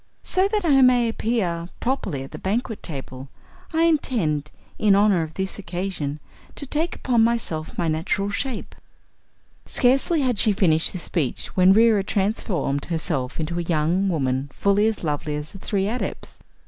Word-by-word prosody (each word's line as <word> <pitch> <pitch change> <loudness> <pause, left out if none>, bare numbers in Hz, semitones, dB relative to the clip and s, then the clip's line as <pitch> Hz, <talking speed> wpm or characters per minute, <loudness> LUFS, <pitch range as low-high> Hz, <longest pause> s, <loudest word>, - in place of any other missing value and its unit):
So 375 +1 +2
that 415 -2 -1
I 275 -4 +5
may 250 -2 +5
appear 190 -7 -1
properly 195 - -2
at 135 - -11
the - - -8
banquet 220 +3 -2
table 135 -3 -6 0.4
I 325 0 +2
intend, 210 - +1 0.3
in 205 -2 +4
honor 200 -3 +4
of 160 0 -6
this 190 +1 -3
occasion, 175 -5 -4 0.4
to 280 - -5
take 310 +5 -1
upon 240 -3 +2
myself 225 -9 -1
my 170 - 0
natural 180 +6 -1
shape." 250 +2 -3 0.9
Scarcely 270 +6 +2
had 250 -6 0
she 215 - +4
finished 165 -5 +2
this 185 - -5
speech 155 -8 -2
when 185 0 +6
Reera 220 -2 +4
transformed 195 -8 -1
herself 155 -6 -2
into 165 +2 -2
a - - 0
young 170 +3 +1
woman 135 -4 -1
fully 200 +7 +2
as 220 -4 -2
lovely 150 -1 -2
as 150 +1 -6
the 195 - -11
three 195 0 -1
Adepts. 240 +4 -4
195 Hz, 160 wpm, -23 LUFS, 160-230 Hz, 0.9 s, when